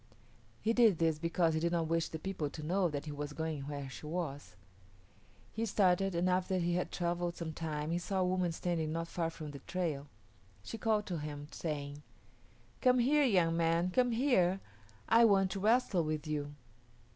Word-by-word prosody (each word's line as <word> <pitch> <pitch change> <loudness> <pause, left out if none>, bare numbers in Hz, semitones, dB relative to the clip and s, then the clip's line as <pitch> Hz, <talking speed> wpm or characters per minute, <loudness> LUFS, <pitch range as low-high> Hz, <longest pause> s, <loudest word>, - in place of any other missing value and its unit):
He 225 - +2
did 230 -7 +5
this 160 -2 +1
because 165 0 +1
he 160 - +1
did 170 +1 0
not 165 -1 +1
wish 165 0 0
the 160 - -5
people 160 -3 -3
to 155 - -8
know 180 +3 +1
that 145 -1 -4
he 150 - -5
was 145 0 -5
going 155 -3 -3
where 140 -2 -5
she 135 +3 -9
was. 145 - -4 1.0
He 225 - -2
started, 195 -2 +2
and 175 +2 +1
after 185 +1 +1
he 175 -1 0
had 180 +1 -1
travelled 175 0 -1
some 165 -2 -4
time 155 -1 -3
he 170 - 0
saw 185 +2 -1
a - - +3
woman 180 -1 +1
standing 165 -2 -2
not 165 +1 -2
far 170 -1 -2
from 160 -2 -8
the 140 - -8
trail. 160 -6 -3 0.6
She 225 - -7
called 215 -1 +1
to 175 -4 -3
him, 145 -1 -6
saying, 145 -2 -4 0.8
"Come 255 -1 +5
here, 280 +5 +4
young 180 -8 +3
man, 165 +2 +2
come 250 +4 +3
here; 225 -7 +2 0.5
I 230 +1 +6
want 195 -4 +4
to 195 - -3
wrestle 215 -4 +3
with 155 0 -2
you." 145 -1 -3
170 Hz, 190 wpm, -33 LUFS, 155-190 Hz, 1.0 s, I